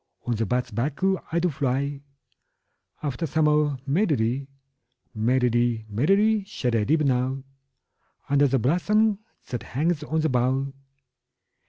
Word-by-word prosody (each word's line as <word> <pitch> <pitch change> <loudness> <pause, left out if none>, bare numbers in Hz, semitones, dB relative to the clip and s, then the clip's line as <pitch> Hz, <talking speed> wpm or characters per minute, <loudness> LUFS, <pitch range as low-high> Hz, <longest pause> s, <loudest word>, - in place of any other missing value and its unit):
On 120 - 0
the 110 -1 -1
bat's 125 +2 -1
back 130 +7 -2 0.3
I 165 - 0
do 175 +1 +2
fly 140 +1 -1 1.0
After 150 +3 -2
summer 150 -1 +2
merrily: 140 - +1 0.7
5 - - -38
Merrily, 120 0 +1
merrily, 195 - +2
shall 125 - -2
I 110 - +2
live 155 +5 +2
now, 130 -1 0 0.8
Under 145 0 +4
the 135 0 +2
blossom 200 - +2 0.3
that 120 -4 -3
hangs 150 +7 -1
on 155 +1 -1
the 160 - +1
bough. 130 +2 0
140 Hz, 130 wpm, -25 LUFS, 125-155 Hz, 1.0 s, Under